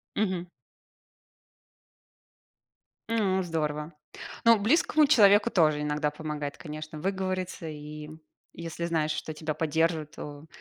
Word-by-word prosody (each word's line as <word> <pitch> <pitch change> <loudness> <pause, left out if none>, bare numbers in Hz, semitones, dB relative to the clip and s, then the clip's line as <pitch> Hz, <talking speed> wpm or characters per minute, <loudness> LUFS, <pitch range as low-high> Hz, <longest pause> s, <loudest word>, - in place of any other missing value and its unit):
Мгм. 185 -4 0 2.6
М, 195 -4 +2
здорово! 155 -2 -2 0.5
Ну, 230 -2 +7
близкому 300 - +4
человеку 210 -5 +6
тоже 155 -7 +3
иногда 150 0 0
помогает, 150 -1 -5
конечно, 155 -1 -7
выговориться. 185 -1 -2
И 150 0 -8 0.4
если 170 0 -6
знаешь, 160 -2 0
что 155 - -4
тебя 155 0 -3
поддержат, 160 0 0
то 145 +1 -9
160 Hz, 100 wpm, -28 LUFS, 150-190 Hz, 2.6 s, Ну